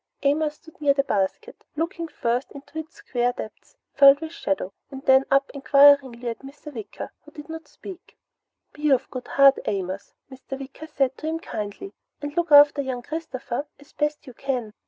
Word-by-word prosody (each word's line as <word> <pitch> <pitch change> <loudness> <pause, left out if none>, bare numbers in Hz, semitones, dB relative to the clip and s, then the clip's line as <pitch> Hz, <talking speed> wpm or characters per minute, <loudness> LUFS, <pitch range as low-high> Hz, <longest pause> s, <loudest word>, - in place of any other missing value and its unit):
Amos 300 +1 +2
stood 320 0 -19
near 280 -2 +4
the 275 - +2
basket, 215 - -2
looking 335 +2 -3
first 245 -4 -2
into 285 +2 -8
its 315 0 -9
square 245 0 -1
depth 220 - -10 0.2
filled 275 0 +8
with 320 0 -6
shadow, 195 - -3 0.2
and 270 -1 -9
then 265 0 +6
up 275 0 +2
enquiringly 275 -3 +5
at 230 - -3
Mr. 285 +2 -11
Wicker, 220 -5 -7
but - - -18
he 295 - -8
did - - -24
not 320 0 -7
speak. 375 -2 -12 0.6
"Be 300 0 -1
of 265 -1 +2
good 255 -1 -6
heart, 275 -1 +5
Amos," 190 -1 -4 0.2
Mr. 265 +1 -8
Wicker 275 +3 -9
said 270 -4 0
to 310 - -5
him 320 +1 -1
kindly, 210 - -6 0.3
"and 290 +1 -6
look 345 -2 0
after 290 0 +8
young 255 -3 -4
Christopher 285 -3 -5
as 290 +1 -19
best 295 0 -2
you 255 - -11
can." 245 -4 -3
275 Hz, 185 wpm, -24 LUFS, 255-300 Hz, 0.6 s, filled